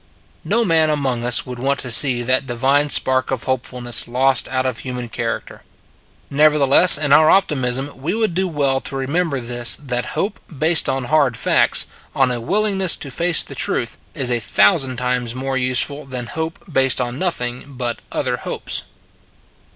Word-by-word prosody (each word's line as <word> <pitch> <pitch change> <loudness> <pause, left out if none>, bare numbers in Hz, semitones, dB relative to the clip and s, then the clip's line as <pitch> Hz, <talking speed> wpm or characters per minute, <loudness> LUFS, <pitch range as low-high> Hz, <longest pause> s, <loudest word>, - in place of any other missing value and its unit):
No 235 0 0
man 160 -4 +2
among 135 -5 -2
us 120 0 +2
would 125 -1 -8
want 140 +2 -1
to 125 - -5
see 125 -1 +3
that 130 +2 0
divine 135 +4 +1
spark 130 -2 +2
of 130 -3 -3
hopefulness 125 -2 -1
lost 130 +2 +1
out 130 0 -2
of 130 -3 -2
human 125 -2 -6
character. - - -5 0.7
Nevertheless 150 +3 +6
in 145 -2 +1
our 155 +1 +5
optimism 135 -7 0
we 165 +9 -2
would 220 -5 -1
do 190 +2 -1
well 140 -5 0
to 135 - -5
remember 140 +2 -2
this 120 0 0
that 125 -4 -5
hope 205 - -3 0.2
based 160 +3 +2
on 135 -1 -2
hard 140 -3 +1
facts, - - +2 0.3
on 135 -2 +2
a 120 -1 -3
willingness 195 - +1
to 140 - -7
face 170 +4 +3
the - - -10
truth, 120 -2 -1 0.2
is 135 -5 0
a 120 - +1
thou 100 -2 +3
sand 130 -2 -1
times 125 -1 -2
more 135 +1 -4
useful 130 +3 0
than 125 -2 -5
hope 160 +6 -5 0.2
based 135 -1 +3
on 125 +1 -4
nothing 125 -9 -2
but 125 -4 -5
other - - -2
hopes. - - -3
135 Hz, 175 wpm, -18 LUFS, 125-150 Hz, 0.7 s, Nevertheless